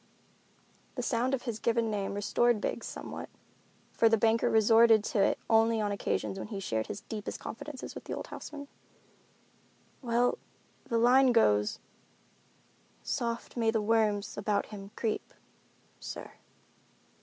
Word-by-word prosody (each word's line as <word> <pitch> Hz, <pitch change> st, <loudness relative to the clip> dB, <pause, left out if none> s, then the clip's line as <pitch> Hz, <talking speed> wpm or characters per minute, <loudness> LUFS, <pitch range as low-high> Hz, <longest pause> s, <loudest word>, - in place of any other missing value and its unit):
The 250 Hz, -, -3 dB
sound 250 Hz, +2 st, +1 dB
of 250 Hz, -, -8 dB
his 235 Hz, -4 st, -4 dB
given 230 Hz, -1 st, +1 dB
name 200 Hz, -1 st, -2 dB
restored 235 Hz, +3 st, +2 dB
Biggs -, -, -3 dB
somewhat, -, -, -7 dB, 0.6 s
for 225 Hz, -, +4 dB
the 225 Hz, -, +4 dB
banker 225 Hz, +1 st, +3 dB
resorted 225 Hz, 0 st, +5 dB
to 210 Hz, -, 0 dB
it -, -, +3 dB
only 225 Hz, 0 st, +4 dB
on 210 Hz, -1 st, 0 dB
occasions 195 Hz, -1 st, -2 dB
when -, -, -5 dB
he 210 Hz, -3 st, -5 dB
shared 110 Hz, -12 st, -2 dB
his 210 Hz, -1 st, -6 dB
deepest 210 Hz, -1 st, -6 dB
confidences 265 Hz, +4 st, -7 dB
with -, -, -10 dB
his -, -, -3 dB
old -, -, -6 dB
houseman. 285 Hz, -1 st, -8 dB, 1.3 s
"Well, 240 Hz, -1 st, +1 dB, 0.5 s
the 230 Hz, -, -1 dB
line 250 Hz, +3 st, +5 dB
goes, 105 Hz, -, +3 dB, 1.3 s
'Soft 235 Hz, -, -3 dB
may 230 Hz, -2 st, +1 dB
the 225 Hz, 0 st, +1 dB
worms 210 Hz, -2 st, +1 dB
about 205 Hz, 0 st, 0 dB
him 200 Hz, -2 st, -9 dB
creep,' 220 Hz, -2 st, -3 dB, 0.6 s
sir." -, -, -7 dB
225 Hz, 140 wpm, -30 LUFS, 205-235 Hz, 1.3 s, resorted